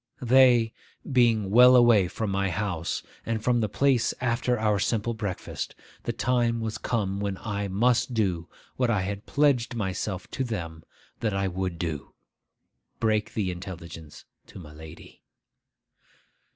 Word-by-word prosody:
They 125 -2 +5 0.4
being 115 -6 +3
well 125 +3 +8
away 120 -6 +6
from 100 +3 -3
my 100 0 0
house 90 -3 -2 0.2
and 115 -1 -3
from 120 -1 +2
the 110 - 0
place 130 +2 +2
after 125 0 0
our 105 -2 +1
simple 115 +3 0
breakfast, 105 -5 -5 0.3
the - - 0
time 120 -2 +1
was 110 -1 -4
come 100 -4 -1
when 100 -2 -2
I 100 -1 -3
must 120 +5 +1
do 90 -6 0 0.3
what 125 -2 +1
I 105 -5 +2
had 100 +2 -5
pledged 140 -5 +2
myself 95 -2 -3
to 135 - -2
them 85 -9 -5 0.4
that 110 -3 -1
I 100 0 0
would 95 -1 -3
do,—break 90 +7 -5
the 100 -4 0
intelligence 85 -4 -9 0.2
to - - -13
my 75 -5 -11
lady. 80 0 -13
105 Hz, 140 wpm, -26 LUFS, 95-120 Hz, 0.4 s, well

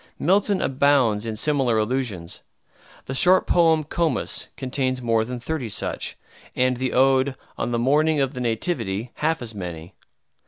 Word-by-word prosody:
Milton 195 +3 +2
abounds 130 -6 +2
in 110 - -3
similar 130 -1 +1
allusions. 105 -7 -2 0.6
The 135 - -5
short 180 +7 +4
poem 165 -3 +3
"Comus" 160 +2 -1
contains 130 -1 -1
more 115 -2 +1
than 125 +2 -5
thirty 130 -1 -4
such, - - -4 0.4
and 125 0 +1
the 130 0 -2
ode 135 +1 +3 0.2
"On - - -2
the 120 - -1
Morning 150 +5 +2
of 135 0 0
the 125 - -5
Nativity" 115 - -2
half 160 -3 0
as 115 -2 -5
many. 85 -4 -7
130 Hz, 150 wpm, -23 LUFS, 115-145 Hz, 0.6 s, short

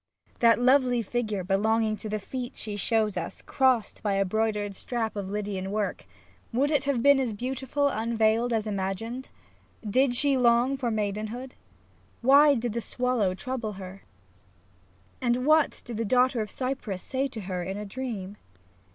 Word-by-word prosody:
That 230 -1 +5
lovely 250 -1 +3
figure 215 -3 -2
belonging 215 +3 +1
to 215 - -6
the 215 - -1
feet 245 +4 -6
she 210 -1 -4
shows 215 -1 +1
us 170 - -4
" - - -32
crossed 260 -5 +1
by 205 -2 0
a 195 0 +2
broidered 210 0 -1
strap 225 +1 -2
of 200 -2 -4
Lydian 200 -2 -3
work," 205 0 -3 0.4
would 275 +5 +1
it 290 -2 +1
have 270 -4 0
been 280 -1 +6
as 250 -5 -1
beautiful 265 +4 -1
unveiled 225 -1 +1
as 220 -2 0
imagined? 210 +5 -3 0.6
Did 255 +4 +3
she 275 +1 +3
long 245 +2 +3
for 260 -3 -2
maidenhood? 215 +4 -3 0.7
Why 280 +3 +7
did 235 -2 -2
the 235 - -2
swallow 240 -7 0
trouble 230 +1 -4
her, 190 0 -9 1.2
and 240 -2 +2
9 250 - -3
SAPPtiO - - -3
what 310 -1 +3
did 235 -3 -6
the 230 - -1
daughter 250 +1 +3
of 210 - -4
Cyprus 255 -8 -4
say 270 +1 -1
to 225 -5 -7
her 185 -2 -4
in 190 +3 -4
a 210 - -5
dream 210 -3 -5
230 Hz, 170 wpm, -27 LUFS, 205-255 Hz, 1.2 s, Why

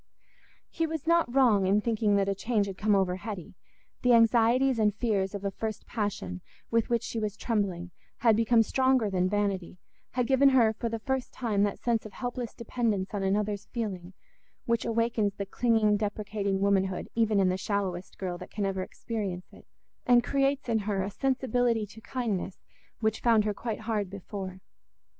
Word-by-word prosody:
He 330 - -1
was 320 -2 -4
not 335 -5 +3
wrong 235 -7 +4
in 200 +2 +4
thinking 215 -2 +1
that 200 -1 +2
a 200 - +1
change 210 +1 0
had 195 -1 -6
come 210 +2 +2
over 185 -2 +1
Hetty: 195 -4 -7 0.5
the 250 -1 +4
anxieties 235 +2 +4
and 210 -2 +2
fears 205 -4 0
of 200 0 -6
a 200 - 0
first 215 +1 -5
passion, 190 - -3 0.3
with 230 -1 +2
which 235 -1 +1
she 225 - -3
was 210 -1 -3
trembling, 190 -6 -2 0.3
had 225 -2 +4
become 230 +1 +4
stronger 260 -2 +2
than 185 -1 +1
vanity, 200 -3 -1 0.4
had 250 -1 +1
given 270 +2 +5
her 235 -5 +4
for 230 +1 -3
the 230 - -2
first 265 +3 -2
time 220 -5 -1
that 200 - -2
sense 235 -2 0
of 215 - -10
helpless 245 -2 -5
dependence 220 -5 -2
on 205 - -2
another's 205 +1 -1
feeling 195 -6 -5 0.5
which 235 -1 0
awakens 230 -3 0
the 200 - -4
clinging 215 0 +2
deprecating 205 -1 -2
womanhood 195 -2 +1
even 220 -3 +2
in 190 -1 +4
the 185 - +1
shallowest 190 -3 -3
girl 180 -2 -4
that - - -9
can 205 -1 -2
ever 190 -1 -1
experience 190 -3 -5
it, - - -16 0.4
and 245 -1 +6
creates 275 0 0
in 225 -2 +2
her 200 -2 -1
a 195 - -4
sensibility 245 -3 +1
to 210 +2 -14
kindness 220 -7 -3 0.4
which 220 0 0
found 225 -3 +4
her 210 - 0
quite 225 +1 -4
hard 215 -3 -2
before. 190 -1 -7
215 Hz, 180 wpm, -28 LUFS, 195-235 Hz, 0.5 s, and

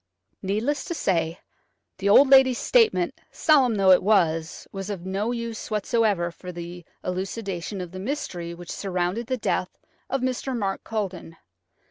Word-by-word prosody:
Needless 220 +9 -1
to 340 - -4
say, 170 - 0 0.6
the 200 +1 +1
old 270 +7 +8
lady's 265 -2 +6
statement, 460 -3 +2
solemn 270 -7 +3
though 195 -2 +5
it 185 - +7
was, 165 -6 +1
was 195 0 -6
of 190 -4 -5
no 195 +5 -1
use 235 -2 -5
whatever 210 -4 +1
for 180 +1 -9
the 175 0 -8 0.2
elucidation 190 0 -4
of 180 -2 -7
the 185 - -7
mystery 190 - -4
which 175 0 -9
surrounded 185 +4 -2
the 255 0 -1
death 185 -4 -2 0.3
of 270 0 -1
Mr. 255 0 -2
Mark 195 -3 -2
Culledon. 190 -6 -4
200 Hz, 150 wpm, -25 LUFS, 180-235 Hz, 0.6 s, old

